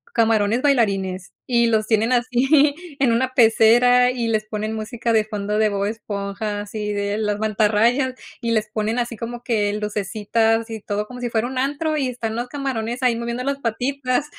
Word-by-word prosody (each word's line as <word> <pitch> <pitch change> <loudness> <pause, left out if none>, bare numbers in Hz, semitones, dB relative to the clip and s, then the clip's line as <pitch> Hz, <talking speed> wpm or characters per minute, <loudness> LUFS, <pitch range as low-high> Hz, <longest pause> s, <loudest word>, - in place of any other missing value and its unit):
camarones 225 0 +2
bailarines, 195 -9 0
y 235 -2 +2
los 220 -2 +1
tienen 225 +2 +2
así 265 +4 +3 0.3
en 255 -4 +4
una 255 +2 0
pecera 245 +2 +5
y 235 -2 -2
les 215 -1 0
ponen 215 0 -4
música 225 +2 -3
de 220 -1 +3
fondo 210 -1 -3
de 220 - +3
Bob 200 -1 -1
Esponja, 205 -1 -4
así 210 0 -4
de 205 0 -2
las 210 -1 -1
mantarrayas. 220 +5 +2 0.3
Y 235 - -2
les 215 -1 +1
ponen 215 +2 -1
así 240 -1 -2
como 240 +2 -6
que 210 -4 0
lucecitas 215 +2 0
y 220 - -5
todo, 210 0 -3
como 250 +2 -10
si 245 -1 -3
fuera 225 0 0
un 260 0 -6
antro, 295 +3 -1
y 270 -3 0
están 230 -3 -4
los 240 +1 -3
camarones 255 -3 -3
ahí 245 -2 +3
moviendo 235 +1 -3
las 275 0 -2
patitas 255 +3 -1
225 Hz, 185 wpm, -21 LUFS, 210-250 Hz, 0.3 s, pecera